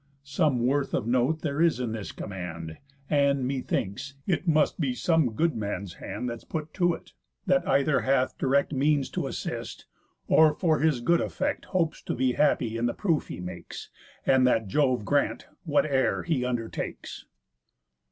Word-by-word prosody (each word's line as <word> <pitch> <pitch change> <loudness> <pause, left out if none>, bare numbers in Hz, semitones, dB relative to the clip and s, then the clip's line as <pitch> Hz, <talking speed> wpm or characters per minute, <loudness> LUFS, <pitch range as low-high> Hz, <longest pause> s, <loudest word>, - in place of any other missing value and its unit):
Some 140 -3 +1
worth 140 +2 +1
of - - -1
note 130 +6 +1
there 145 0 -1
is 165 -7 +3
in 120 -3 -2
this 110 -2 -5
command; 85 -5 -7 0.3
And, 140 -2 +2
methinks, 130 0 -3
it 175 -1 -1
must 155 +1 +2
be 135 -6 0
some 160 -6 +2
good 165 +7 +1
man's 100 -3 -4
hand 125 - -4
That's 115 -1 -5
put 155 -1 -5
to 175 -2 +2
it, - - -15 0.3
that 180 -1 +2
either 140 +1 +3
hath 130 -1 +1
direct 140 +2 +2
Means 140 0 +1
to - - -2
assist, - - -5 0.4
or, 155 -1 +5
for 160 -3 +2
his 155 -6 +2
good 170 +7 +3
affect, - - -2
Hopes 170 -4 -1
to - - -3
be 130 -1 +2
happy 120 -5 +1
in 120 +1 +1
the 120 - -2
proof 165 -7 0
he - - -7
makes; 90 -1 -8 0.3
And 130 -1 +4
that 115 -4 +2
Jove 130 -1 +1
grant, 145 +3 0 0.2
whate'er 145 -3 +2
he 155 -8 0
undertakes." 120 -3 -4
135 Hz, 165 wpm, -27 LUFS, 120-155 Hz, 0.4 s, or